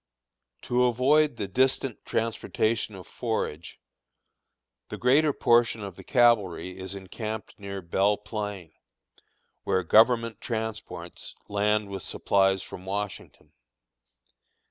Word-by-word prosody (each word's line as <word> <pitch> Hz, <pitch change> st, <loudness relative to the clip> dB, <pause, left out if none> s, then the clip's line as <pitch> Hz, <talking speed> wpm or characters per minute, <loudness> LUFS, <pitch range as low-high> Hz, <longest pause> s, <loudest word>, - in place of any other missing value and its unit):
To 125 Hz, +1 st, +2 dB
avoid 130 Hz, +3 st, +3 dB
the 100 Hz, -, -3 dB
distant 130 Hz, +3 st, 0 dB
transportation 115 Hz, -1 st, -1 dB
of 95 Hz, -, -10 dB
forage, 85 Hz, -10 st, -4 dB, 1.1 s
the -, -, -5 dB
greater 145 Hz, +5 st, +4 dB
portion 120 Hz, -4 st, +3 dB
of 100 Hz, -3 st, -7 dB
the -, -, -12 dB
cavalry 100 Hz, -7 st, +2 dB
is 95 Hz, +1 st, -5 dB
encamped 105 Hz, +3 st, -6 dB
near 100 Hz, -1 st, -6 dB
Belle 100 Hz, +4 st, +2 dB
Plain, 105 Hz, -5 st, -6 dB, 0.9 s
where 95 Hz, -, 0 dB
government 115 Hz, +3 st, +4 dB
transports 110 Hz, -7 st, -5 dB
land 105 Hz, +1 st, +1 dB
with 95 Hz, -1 st, -5 dB
supplies 95 Hz, 0 st, +1 dB
from 90 Hz, -, -10 dB
Washington. 100 Hz, +1 st, -6 dB
105 Hz, 105 wpm, -27 LUFS, 95-120 Hz, 1.1 s, greater